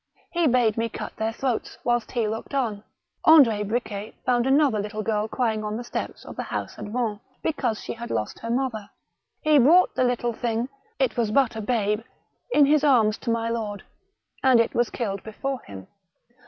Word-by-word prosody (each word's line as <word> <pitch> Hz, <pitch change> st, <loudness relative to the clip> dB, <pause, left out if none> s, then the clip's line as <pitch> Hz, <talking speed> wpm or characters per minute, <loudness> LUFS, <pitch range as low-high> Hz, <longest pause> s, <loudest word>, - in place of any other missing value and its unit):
He 340 Hz, -2 st, +2 dB
bade 240 Hz, -4 st, +3 dB
me 230 Hz, 0 st, 0 dB
cut -, -, -7 dB
their 220 Hz, +1 st, -1 dB
throats 245 Hz, 0 st, -3 dB
whilst 240 Hz, -2 st, 0 dB
he 235 Hz, -3 st, +1 dB
looked 225 Hz, +6 st, -5 dB
on. 220 Hz, -6 st, -1 dB, 0.4 s
Andr6 230 Hz, -10 st, +6 dB
Bricket 215 Hz, -2 st, -3 dB
found 245 Hz, -1 st, +2 dB
another 270 Hz, -5 st, +3 dB
little 210 Hz, +1 st, -4 dB
girl 215 Hz, -1 st, 0 dB
crying 220 Hz, -2 st, -1 dB
on 210 Hz, 0 st, -3 dB
the 240 Hz, -, -5 dB
steps -, -, -5 dB
of -, -, -9 dB
the -, -, -3 dB
house -, -, -5 dB
at -, -, -5 dB
Vannes 215 Hz, -1 st, -2 dB, 0.2 s
because 245 Hz, -8 st, -1 dB
she -, -, -4 dB
had 235 Hz, +1 st, -8 dB
lost 105 Hz, -, -3 dB
her 230 Hz, -, -6 dB
mother. 235 Hz, -4 st, -2 dB, 0.5 s
He 305 Hz, -1 st, +5 dB
brought 335 Hz, +9 st, +5 dB
the -, -, +1 dB
little 240 Hz, -1 st, 0 dB
thing 230 Hz, +2 st, -2 dB
— -, -, -42 dB
it -, -, +1 dB
was 230 Hz, -3 st, +1 dB
but 245 Hz, +1 st, +2 dB
a 220 Hz, -, -3 dB
babe 210 Hz, -2 st, 0 dB, 0.3 s
— -, -, -36 dB
in 295 Hz, -10 st, +6 dB
his 295 Hz, +1 st, +3 dB
arms 230 Hz, -7 st, +4 dB
to 240 Hz, -, -5 dB
my 230 Hz, 0 st, 0 dB
lord, 215 Hz, -4 st, -3 dB, 0.6 s
and 260 Hz, -3 st, +5 dB
it 230 Hz, -, +2 dB
was 240 Hz, -1 st, +1 dB
killed 200 Hz, -5 st, -3 dB
before 260 Hz, +5 st, -4 dB
him. 95 Hz, -2 st, -9 dB
230 Hz, 200 wpm, -25 LUFS, 215-255 Hz, 0.6 s, Andr6